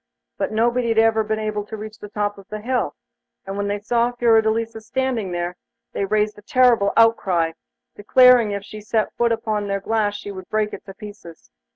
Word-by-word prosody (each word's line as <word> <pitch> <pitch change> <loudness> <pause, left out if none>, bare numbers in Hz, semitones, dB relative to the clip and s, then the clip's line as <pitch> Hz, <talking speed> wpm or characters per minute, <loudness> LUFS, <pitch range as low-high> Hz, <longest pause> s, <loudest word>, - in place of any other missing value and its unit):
But - - -1
nobody 235 +2 +1
had 225 - 0
ever 225 0 +4
been 215 0 -2
able 215 -1 -2
to 220 - -7
reach 215 +1 -9
the 210 - -9
top 205 -1 -2
of 195 - -15
the 215 - -6
hill, 250 +3 -1 0.5
and 195 0 -5
when 200 0 -2
they 205 0 -1
saw 235 +3 0
Fiordelisa 225 -1 +1
standing 235 -4 -2
there, 175 0 -3 0.4
they 200 - -1
raised 210 +1 0
a - - -15
terrible 235 -3 +3
outcry, 190 -8 +3 0.4
declaring 245 +2 +5
that 200 - -2
if 200 - -5
she 215 +1 -10
set 215 +1 -1
foot 235 -1 +1
upon 215 -2 -1
their 200 0 -1
glass 210 0 0
she 205 0 -7
would 185 -2 -10
break 215 -1 0
it - - -8
to 195 - -9
pieces. 200 - -12
215 Hz, 205 wpm, -21 LUFS, 205-230 Hz, 0.5 s, declaring